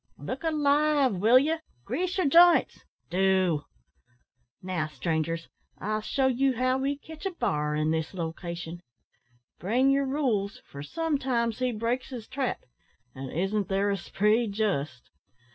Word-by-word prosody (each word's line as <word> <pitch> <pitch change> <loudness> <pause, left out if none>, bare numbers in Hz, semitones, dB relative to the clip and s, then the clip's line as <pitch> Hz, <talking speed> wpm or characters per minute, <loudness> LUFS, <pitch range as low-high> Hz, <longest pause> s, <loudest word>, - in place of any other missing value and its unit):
Look - - -6
alive, 295 -3 +3
will 225 +7 +6
you? 315 +5 +2 0.3
grease 360 - -2
your 370 - +2
jints, 340 +4 +5 0.3
do. 185 -4 +2 1.0
Now, 180 -4 -2
strangers, 160 +3 -2 0.3
I'll 215 +2 -2
shew 265 +4 +1
you 265 +1 +2
how 255 +1 +1
we 275 +1 -1
ketch 320 +5 -7
a - - -3
bar 150 - -1
in 155 +1 +1
this 160 -1 -1
lo 165 -4 -3
cation; 170 0 -7 0.8
bring 250 +8 +2
yer 275 0 +2
rules, 255 -8 -1
for 140 - -7
sometimes 260 - -1
he 255 -1 +1
breaks 235 +3 -2
his 240 -4 -7
trap, 265 -2 -2 0.5
an' 135 0 -7
isn't 195 +5 -1
there 200 +1 +1
a 200 - 0
spree 210 +5 +1
jist!" 170 - -2
220 Hz, 145 wpm, -28 LUFS, 175-275 Hz, 1.0 s, will